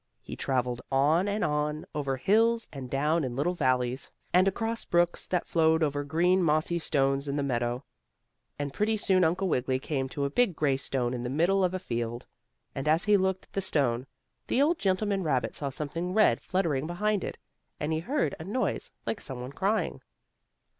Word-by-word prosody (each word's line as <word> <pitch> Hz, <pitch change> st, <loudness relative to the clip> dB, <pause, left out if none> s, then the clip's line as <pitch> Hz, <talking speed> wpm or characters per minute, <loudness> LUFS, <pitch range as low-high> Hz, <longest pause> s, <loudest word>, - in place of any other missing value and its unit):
He -, -, -7 dB
traveled 125 Hz, -2 st, -1 dB
on 150 Hz, +8 st, +3 dB
and 205 Hz, +1 st, -1 dB
on, 150 Hz, +1 st, -1 dB
over 140 Hz, -3 st, -1 dB
hills 225 Hz, -, +3 dB
and 135 Hz, -3 st, -7 dB
down 150 Hz, +5 st, +1 dB
in 125 Hz, -2 st, -3 dB
little 150 Hz, +7 st, 0 dB
valleys, 130 Hz, -4 st, 0 dB, 0.2 s
and 185 Hz, +2 st, +5 dB
across 225 Hz, +4 st, -1 dB
brooks 175 Hz, 0 st, +1 dB
that 180 Hz, -2 st, 0 dB
flowed 160 Hz, -1 st, +3 dB
over 145 Hz, -1 st, 0 dB
green 175 Hz, +6 st, +2 dB
mossy 160 Hz, +1 st, +1 dB
stones 140 Hz, -3 st, +1 dB
in 140 Hz, -, -2 dB
the 145 Hz, -, 0 dB
meadow, 120 Hz, -1 st, -1 dB, 0.7 s
and 145 Hz, -1 st, -4 dB
pretty 215 Hz, +5 st, +1 dB
soon 190 Hz, -3 st, +3 dB
Uncle 180 Hz, +4 st, +1 dB
Wiggily 130 Hz, -5 st, +1 dB
came 135 Hz, -1 st, -2 dB
to 140 Hz, +1 st, -2 dB
a 140 Hz, -, -2 dB
big 240 Hz, -2 st, +2 dB
gray 145 Hz, -3 st, +2 dB
stone 130 Hz, -2 st, -1 dB
in 125 Hz, -, -3 dB
the 120 Hz, -, -3 dB
middle 175 Hz, +8 st, +2 dB
of 185 Hz, 0 st, +1 dB
a -, -, +1 dB
field. 120 Hz, -7 st, -4 dB, 0.5 s
And, 135 Hz, +2 st, -4 dB
as 160 Hz, +3 st, +3 dB
he 210 Hz, -1 st, +5 dB
looked 190 Hz, -1 st, +1 dB
at -, -, -38 dB
the 195 Hz, -, 0 dB
stone, 135 Hz, -8 st, +1 dB, 0.4 s
the -, -, +1 dB
old 310 Hz, +4 st, +3 dB
gentleman 195 Hz, +1 st, +1 dB
rabbit 140 Hz, -7 st, 0 dB
saw 140 Hz, -, -3 dB
something 165 Hz, +7 st, -3 dB
red 215 Hz, -, +4 dB
fluttering 160 Hz, -7 st, 0 dB
behind 205 Hz, +3 st, 0 dB
it, -, -, -5 dB, 0.4 s
and 150 Hz, +2 st, -1 dB
he 160 Hz, -, 0 dB
heard 265 Hz, -, -1 dB
a -, -, -6 dB
noise 210 Hz, +9 st, -2 dB, 0.2 s
like 220 Hz, -, -3 dB
some 130 Hz, -3 st, -5 dB
one 125 Hz, +2 st, -6 dB
crying. 200 Hz, +8 st, -1 dB
155 Hz, 195 wpm, -28 LUFS, 135-190 Hz, 0.7 s, and